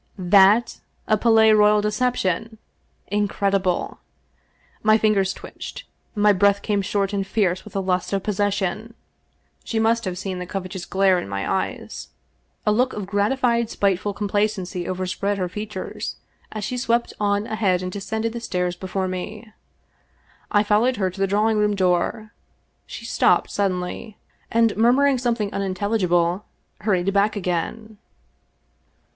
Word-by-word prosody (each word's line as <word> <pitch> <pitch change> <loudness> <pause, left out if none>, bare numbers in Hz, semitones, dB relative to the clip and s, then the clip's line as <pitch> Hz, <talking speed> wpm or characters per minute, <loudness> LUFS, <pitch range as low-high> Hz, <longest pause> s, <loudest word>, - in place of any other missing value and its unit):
That 195 +5 +4 0.3
a 215 - +3
Palais 220 0 +5
Royal 210 0 +5
deception! 220 -1 -1 0.5
Incredible! 195 -3 0 0.8
My 215 0 +5
fingers 205 -3 +2
twitched, - - -9 0.3
my 210 0 +4
breath 200 +1 +3
came 205 -2 0
short 195 +1 -1
and 200 - 0
fierce 190 -4 0
with 210 - -13
the 195 - -1
lust 185 -1 -1
of 195 -1 -1
possession. 205 +2 -1 0.7
She 225 - -3
must 225 +1 +2
have 180 -1 -3
seen 190 -1 -4
the 180 - -6
covet 185 0 -5
ous 185 -1 -5
glare 190 -1 +3
in 100 - -7
my 100 0 -3
eyes. - - -3 0.6
A 210 - +3
look 250 +4 +2
of 205 - -4
gratified 235 +4 +1
spiteful 200 -1 0
com 210 0 -3
placency 195 -3 -1
overspread 185 +2 -2
her 185 -2 -1
features, 205 +1 -6 0.4
as 215 -1 -5
she 250 +5 -3
swept 235 -1 0
on 205 0 +1
ahead 200 -5 0
and 185 - -4
descended 220 +3 -3
the 235 - -4
stairs 180 -5 -2
before 190 +1 -3
me. 210 +4 -6 1.0
I 205 -2 +3
followed 215 +5 +2
her 190 -2 0
to 190 - -12
the 195 - +3
drawing 210 +2 +2
room 210 0 +2
door. 185 +3 0 0.6
She - - -8
stopped - - +2
suddenly, 195 +2 -2 0.3
and 230 -1 +2
murmur 245 +6 +4
ing 275 -3 +2
something 230 -4 -1
unintelligible 190 -2 0 0.4
hurried 195 -2 0
back 205 +2 +2
again. 205 +4 -3
205 Hz, 145 wpm, -22 LUFS, 185-220 Hz, 1.0 s, Palais